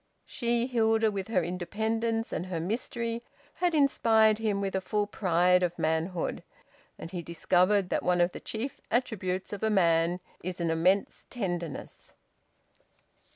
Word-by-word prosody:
She, 235 -1 0
Hilda, 225 -3 +2
with 195 -2 -4
her 195 -6 +1
independence 220 +6 -2
and 180 - -3
her 175 -3 -3
mystery, 230 +5 -3 0.3
had 350 -1 0
inspired 225 -7 +4
him 210 -3 0
with 195 -1 -2
a 190 - 0
full 210 +2 0
pride 180 -2 +2
of 175 -1 -1
manhood. 160 +2 -1 0.6
And 165 - -8
he 180 -2 -4
discovered 180 +3 +2
that - - 0
one 180 0 +1
of 175 +1 +3
the - - -8
chief 240 +5 -5
attributes 195 -6 -1
of 205 - -5
a 220 - +1
man 170 -3 +3 0.2
is 180 +1 -5
an 170 -1 0
immense 180 +5 +1
tenderness. 175 - -5
195 Hz, 150 wpm, -29 LUFS, 175-225 Hz, 0.6 s, inspired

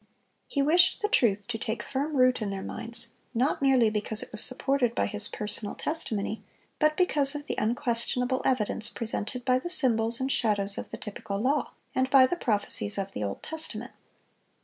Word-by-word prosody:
He 280 - -1
wished 350 +7 +3
the - - +2
truth 210 - +1
to 225 -2 -4
take 225 0 -4
firm 285 +2 -3
root 255 -1 +3
in 210 - -2
their 195 -1 -5
minds, 235 0 -2 0.3
not 260 +6 0
merely 265 -4 +3
because 215 0 -2
it - - -12
was 215 - +6
supported 255 -2 +2
by - - 0
His 210 -1 +5
personal 210 0 -2
testimony, 220 -9 -3 0.4
but 305 0 +2
because 295 -6 +3
of 290 0 -6
the - - -3
unquestionable 245 +3 -1
evidence 220 -3 +1
presented 230 +1 -5
by 255 0 +2
the 345 - -6
symbols 230 -6 +3
and 265 +1 -2
shadows 205 -4 0
of - - -8
the 225 - -8
typical 205 -3 -6
law, 265 +8 -1 0.2
and 260 0 0
by 265 -1 +6
the 305 - -2
prophecies 210 -6 +1
of 195 0 -4
the 105 - -5
Old 100 -1 -5
Testament. 260 -7 -2
240 Hz, 185 wpm, -27 LUFS, 215-275 Hz, 0.4 s, was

